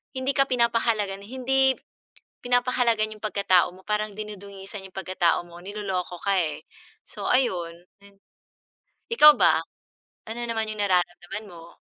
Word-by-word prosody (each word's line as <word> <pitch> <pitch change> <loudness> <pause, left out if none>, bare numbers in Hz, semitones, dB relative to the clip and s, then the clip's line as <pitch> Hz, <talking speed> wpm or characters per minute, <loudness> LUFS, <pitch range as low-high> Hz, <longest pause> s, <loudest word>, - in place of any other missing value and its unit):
hindi 260 +1 0
ka 275 - +4
pinapahalagahan, 230 -5 +1
hindi 265 +3 +1 0.7
pinapahalagahan 245 -3 +1
yung - - -25
pagkatao 195 -4 +3
mo, 190 - -16
parang 210 0 -1
dinudungisan 200 -1 -8
yung 190 - -23
pagkatao 185 -3 +1
mo, 170 0 -12
niloloko 190 -3 -4
ka 200 -1 +2
eh, 155 -3 -2 0.4
so - - -6
ayun, 180 -10 +1 0.3
din. 200 0 -18 1.0
Ikaw 300 -9 +10
ba, 160 -3 +5 0.7
ano 230 +2 -5
naman 225 -1 -1
yung 215 -1 -6
nararamdaman 180 +2 -1
mo? 170 -1 -13
205 Hz, 130 wpm, -25 LUFS, 185-235 Hz, 1.0 s, Ikaw